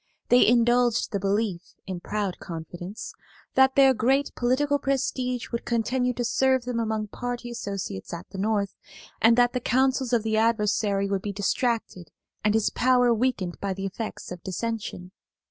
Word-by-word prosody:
They 245 0 +6
indulged 240 0 +3
the 200 - -1
belief, 200 -2 0 0.2
in 185 -2 -5
proud 200 0 -3
confidence, 175 +4 -7 0.4
that 265 0 +4
their 270 -1 +6
great 265 +4 +1
political 285 +4 +1
prestige 255 -3 -1
would 235 - -3
continue 250 +2 0
to 240 0 -2
serve 260 +1 +2
them 245 -2 -2
among 220 -2 -2
party 245 +1 -5
associates 195 - -5
at 170 +1 -7
the 190 - -6
North, 205 -1 0 0.5
and 230 +1 +5
that 245 0 +4
the 250 - 0
counsels 260 +1 +1
of 235 -3 +2
the 220 -1 0
adversary 210 -3 +1
would 195 -1 -1
be 205 - -3
distracted 205 - -1 0.3
and 210 0 +2
his 220 - +2
power 245 -1 +3
weakened 220 -7 -1
by 195 -1 -2
the 195 +1 -4
effects 210 +1 -6
of 180 -1 -7
dissension. 195 -2 -4
230 Hz, 165 wpm, -26 LUFS, 200-250 Hz, 0.5 s, They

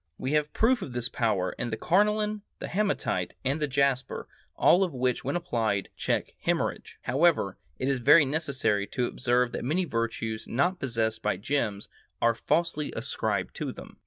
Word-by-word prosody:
We 130 - -3
have 150 0 +1
proof 240 +1 +3
of 135 - -6
this 120 0 -2
power 100 -6 0
in 120 - -2
the 110 - -3
carnelian, 210 +3 +2 0.2
the - - -6
hematite, 205 +1 -1
and 140 +4 0
the 150 - +1
jasper, 140 -1 0 0.3
all 185 +3 +5
of 175 -7 -2
which 125 -1 0
when - - -2
applied, 115 - -1
check - - -1
hemorrhage.... - - -1
However, 135 - +2 0.2
it 130 - -2
is 135 -2 +1
very 150 +6 +7
necessary 135 -8 0
to 125 - -1
observe 125 0 +1
that - - -4
many 165 +9 +1
virtues 115 -4 -3
not 175 +9 +1
possessed 110 -3 -1
by 105 -3 0
gems 110 -2 -1 0.3
are 115 0 +4
falsely 155 +3 0
ascribed - - -1
to - - -3
them. - - -12
130 Hz, 170 wpm, -28 LUFS, 115-165 Hz, 0.3 s, very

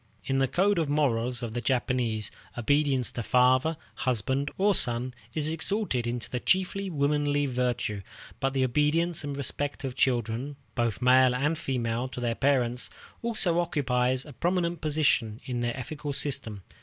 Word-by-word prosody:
In 135 0 0
the 135 - +3
code 195 +6 +2
of 160 -3 0
morals 125 -4 +1
of 115 -2 -4
the 120 - -2
Japanese, 120 -4 0 0.3
obedience 140 0 +2
to 120 - -4
father, 130 +6 +3 0.2
husband, 130 +3 0
or 205 +2 +3
son 125 -5 +1 0.2
is 155 -1 0
exalted 160 - -1
into 120 0 -3
the 125 - -3
chief 185 +7 +2
womanly 145 -6 0
virtue, 125 -5 -1 0.4
but 135 0 0
the 135 -1 +1
obedience 150 +6 +1
and 145 -1 -4
respect 145 +1 -2
of 130 -2 -3
children, 125 +1 0 0.2
both 120 -1 -1
male 130 0 +5
and 145 +5 +1
female, 120 -4 -2
to 130 - -7
their 120 -1 0
parents, 125 -2 +1 0.3
also 215 -7 +2
occupies 130 -6 0
a 150 - -11
prominent 170 +2 -1
position 145 -8 +1
in 125 -2 -3
their 120 +1 -2
ethical 145 +3 -5
system. 130 -9 0
130 Hz, 155 wpm, -28 LUFS, 125-150 Hz, 0.4 s, male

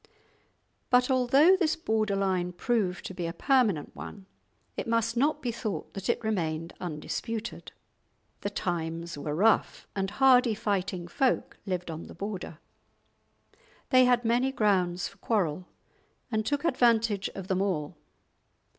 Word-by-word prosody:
But 250 +1 +4
although 270 +8 +5
this 335 -5 +1
border 220 -9 0
line 185 -2 0
proved 190 -2 -1
to - - -5
be 175 -2 -3
a 165 - -4
permanent 230 - +1
one, 195 -2 -9 0.5
it - - -4
must 230 0 +1
not 295 +4 +1
be 245 - 0
thought 215 -8 -5
that 195 +1 -5
it 235 - 0
remained 165 -6 -2
undisputed. 185 +7 -5 0.7
The 200 - -3
times 170 -3 -3
were 150 +1 -4
rough, 220 +7 +2
and 195 -1 -1
hardy 250 0 +4
fighting 190 -4 -2
folk 255 +8 0
lived 180 -2 -2
on 160 +1 -7
the - - -11
Border. 195 -5 -5 1.3
They 255 -1 +7
had 245 -1 +3
many 245 +3 +2
grounds 185 -7 +1
for 200 - -15
quarrel, 185 -6 -1 0.6
and 220 -1 -1
took 290 +2 -1
advantage 230 - +2
of 195 -1 -6
them 190 0 0
all. 165 -7 -1
205 Hz, 140 wpm, -28 LUFS, 180-240 Hz, 1.3 s, They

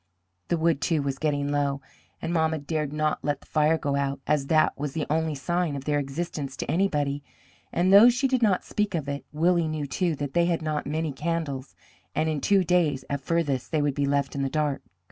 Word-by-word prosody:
The 170 - +1
wood, 160 -3 +1
too, 160 -4 +1
was 135 -1 -3
getting 145 -2 0
low, 140 -1 0 0.4
and 165 +1 -2
mamma 160 -1 +2
dared 150 0 -2
not 155 0 -1
let 145 -2 -1
the - - -18
fire 155 +1 +2
go 140 -3 -1
out, 140 0 -1
as 145 -2 +1
that 155 0 +3
was 145 -1 -4
the 160 -2 -2
only 160 -1 0
sign 170 +2 -1
of 140 -1 -6
their 145 -1 +1
existence 140 -1 -4
to - - -3
anybody; 145 -6 0 0.5
and 185 +2 +2
though 210 +5 +10
she 245 +3 +1
did 260 -2 +1
not 200 -5 +2
speak 210 -3 -1
of 150 -4 -2
it, 140 0 -4
Willie 170 +2 +2
knew, 155 -2 -3
too, 170 +3 -1
that 145 -1 -4
they 170 0 +3
had 170 -2 0
not 155 -2 -2
many 155 +1 -1
candles, 145 -2 -3 0.4
and 155 - +1
in 150 -3 -2
two 200 -2 +3
days 160 -7 +1
at 140 -1 -1
farthest 145 -4 -1
they 155 -3 +1
would 145 -1 +1
be 140 0 0
left 140 -1 0
in 140 - -2
the 135 - 0
dark. 150 -1 -1
150 Hz, 220 wpm, -26 LUFS, 140-165 Hz, 0.5 s, though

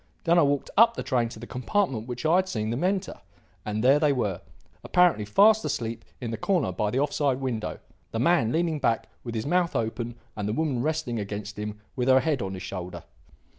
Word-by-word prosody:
Then 170 +1 +4
I - - +6
walked 145 -2 +1
up 230 +2 +6
the - - -4
train 120 -4 0
to 115 - -10
the 115 - -8
compartment 125 - -1
which 125 +4 -5
I 165 +3 +5
had 190 0 +1
seen 110 -5 -2
them 120 +8 -2
enter. 190 - -1 0.4
And 105 +1 -2
there 135 +3 +6
they 150 -2 +3
were, 105 -9 -1 0.4
apparently 175 - +3
fast 215 - +5
asleep 115 -1 -3 0.2
in 120 -3 -4
the 115 - -3
corner 170 - +1
by 105 +3 -1
the 120 - -2
off 145 +1 +1
side 140 -4 +1
window, 125 -5 -3 0.3
the - - -4
man 130 -2 +3
leaning 165 0 0
back 115 -4 0
with 115 -2 -5
his 110 - -2
mouth 175 +2 +1
open 115 +1 -2 0.2
and 105 -1 -3
the - - -1
woman 140 -3 0
resting 150 -5 -1
against 105 +1 -5
him 105 0 -5 0.2
with 125 -2 -1
her 130 0 +6
head 145 -2 0
on 95 0 -3
his 95 - -7
shoulder. 90 -1 -6
125 Hz, 220 wpm, -26 LUFS, 110-160 Hz, 0.4 s, I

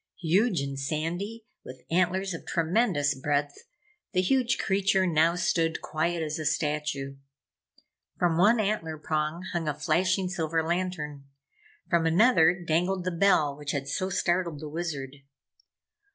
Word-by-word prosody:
Huge 185 - +2
and 140 -1 -4
sandy, 175 +10 -3 0.2
with 130 0 -11
antlers 185 +2 +1
of 165 - -7
tremendous 165 -4 +1
breadth, 145 +1 -1 0.6
the 185 - +3
huge 240 +3 +2
creature 195 -1 +2
now 165 0 +3
stood 165 -2 0
quiet 165 +1 -2
as 155 +1 -3
a 155 - -4
statue. 145 -3 -2 1.0
From 175 -2 +2
one 210 +7 +4
antler 195 -7 -1
prong 155 +3 -2
hung 170 -2 -2
a 150 - -1
flashing 180 +5 +1
silver 165 -3 -1
lantern. 165 -5 -3 0.6
From 170 -2 +2
another 175 -2 +4
dangled 180 +4 0
the 185 - -1
bell 165 -5 +3
which 145 0 -5
had 140 -2 -3
so 185 +7 -2
startled 175 -4 0
the 155 0 -7
Wizard. 145 -4 -5
165 Hz, 140 wpm, -27 LUFS, 150-185 Hz, 1.0 s, one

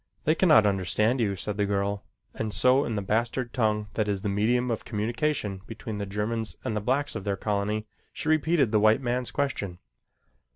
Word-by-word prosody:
"They 155 - +3
cannot 160 - +5
understand 105 +5 +1
you," 100 -3 +1
said 100 +2 -4
the 105 -1 +1
girl 100 0 -1 0.3
and 110 -1 -3
so 130 +6 +4
in 115 - -2
the 105 - -2
bastard 120 +4 -1
tongue 105 -3 +1
that 105 0 0
is 100 -1 -2
the 105 - 0
medium 120 +5 +1
of 115 - -2
communication 110 -2 -2
between 110 -1 -6
the 100 - -3
Germans 105 +2 -3
and 110 - -1
the 105 - -1
blacks 135 +7 0
of - - -4
their 100 -1 -1
colony, 105 +1 -1 0.3
she - - -6
repeated 155 -5 +3
the 110 - +4
white 110 +4 +4
man's 125 0 -1
question. 105 -10 -2
110 Hz, 195 wpm, -27 LUFS, 105-125 Hz, 0.3 s, cannot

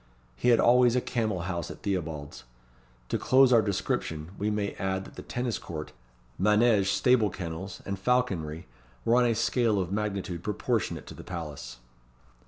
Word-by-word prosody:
He 95 - +1
had 120 -2 +5
always 125 0 +5
a - - +4
camel 110 -7 -1
house 85 -2 -3
at - - -10
Theobalds. 80 -9 -3 0.7
To - - 0
close 130 -1 +5
our 115 - +7
description, 90 -5 -2
we 105 +2 -1
may 105 -1 -1
add 95 0 -1
that - - -12
the - - -7
tennis 125 -4 -3
court, 75 -2 -7 0.5
manége 105 0 +4
stable 110 +3 +3
kennels, 90 +1 -6
and 100 -1 -4
falconry 95 -9 0 0.4
were 120 - +4
on 125 -1 +4
a 115 - +1
scale 115 -1 +2
of 90 -1 -2
magnitude 100 -4 -2
proportionate 105 +1 -1
to - - -9
the - - -10
palace. 75 -8 -7
100 Hz, 165 wpm, -28 LUFS, 85-115 Hz, 0.7 s, our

